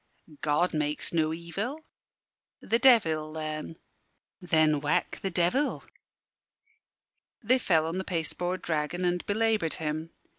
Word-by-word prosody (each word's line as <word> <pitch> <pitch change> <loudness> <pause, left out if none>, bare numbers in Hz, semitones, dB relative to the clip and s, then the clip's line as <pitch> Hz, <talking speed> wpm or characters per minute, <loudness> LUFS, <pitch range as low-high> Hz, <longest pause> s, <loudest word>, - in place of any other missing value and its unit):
"God 150 +4 +1
makes 150 +1 -1
no 160 -2 +2
evil." 195 - -4 0.8
"The 230 - 0
Devil, 160 -12 +4
then." 155 0 -5 0.7
"Then 155 -4 +3
whack 150 +1 0
the 195 - -1
Devil." 185 +12 +1 1.6
They 255 +1 +3
fell 165 -8 +2
on 165 +3 -2
the - - -2
pasteboard 175 +1 -2
dragon 160 +3 -1
and 175 0 0
belaboured 215 -5 +1
him. 155 +1 -3
165 Hz, 115 wpm, -28 LUFS, 155-190 Hz, 1.6 s, Devil